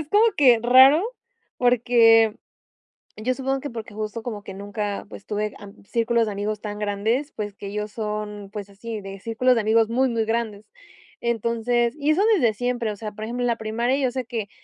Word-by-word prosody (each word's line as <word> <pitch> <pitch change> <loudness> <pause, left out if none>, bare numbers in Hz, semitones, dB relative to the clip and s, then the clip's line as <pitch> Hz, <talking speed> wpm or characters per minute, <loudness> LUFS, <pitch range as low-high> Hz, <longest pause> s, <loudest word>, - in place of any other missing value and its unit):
es 310 - -6
como 415 +1 +5
que 250 -5 +6
raro 260 +7 +7 0.6
porque 230 -2 +5 0.8
yo 245 +4 0
supongo 270 +1 -2
que 285 -1 -6
porque 220 -3 -8
justo 215 +1 -4
como 215 -4 -6
que 195 - -8
nunca, 205 +1 -4
pues 200 - -11
tuve 210 0 -2
am 200 -1 -12
círculos 230 +1 +1
de - - -2
amigos 205 +1 -3
tan 210 -1 -5
grandes, 215 +8 -1
pues 205 -2 -5
que 200 - -8
ellos 210 +1 -4
son, 210 -2 -5
pues 205 -1 -6
así, 215 +2 -7
de 195 0 -8
círculos 235 +5 +2
de 230 - +2
amigos 220 +1 +3
muy, 255 +3 +2
muy 230 -2 0
grandes. 220 -2 -2 0.5
Entonces, 235 +1 0
y 295 +1 +1
eso 340 +6 +2
desde 240 - +2
siempre, 245 0 -2
o - - -6
sea, 215 +1 -6
por 215 +1 -8
ejemplo, 245 +3 -3
en - - +1
la 235 -1 0
primaria 235 +4 -1
yo 265 -3 0
sé 260 0 -3
que, 220 -4 -4
225 Hz, 200 wpm, -23 LUFS, 210-245 Hz, 0.8 s, raro